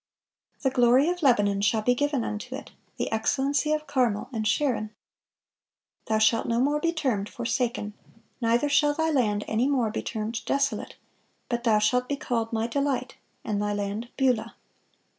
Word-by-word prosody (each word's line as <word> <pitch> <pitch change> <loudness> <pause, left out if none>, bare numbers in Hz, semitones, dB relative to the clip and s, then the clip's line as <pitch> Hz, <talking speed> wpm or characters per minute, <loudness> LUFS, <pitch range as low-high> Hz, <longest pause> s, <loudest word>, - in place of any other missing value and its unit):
"The 265 - +2
glory 255 +4 +4
of 355 0 -2
Lebanon 205 -8 +3
shall 215 +2 +2
be 245 - +4
given 285 -1 0
unto 210 -1 -5
it, - - -9 0.3
the - - -2
excellency 275 +6 +1
of 305 0 0
Carmel 250 -8 0
and 215 -2 -1
Sharon." 240 -5 0 1.2
"Thou 220 - +2
shalt 220 +1 +3
no 230 0 +1
more 290 +4 +2
be 335 +1 +1
termed 255 -11 -1
Forsaken; 235 -3 -2 0.5
neither 235 +4 +2
shall 290 0 +3
thy 320 0 +1
land 210 -7 +1
any 230 +4 +1
more 250 -6 +1
be - - -3
termed 220 +1 -4
Desolate: 275 -6 -1 0.5
but 240 0 -2
thou 220 -2 +4
shalt 250 +4 +1
be 285 - 0
called 230 -5 -2
My 225 -1 0
Delight, 280 +2 -2 0.3
and 205 -2 -1
thy 205 0 -1
land 205 +3 -3
Beulah." 245 -4 +1
240 Hz, 165 wpm, -26 LUFS, 215-280 Hz, 1.2 s, glory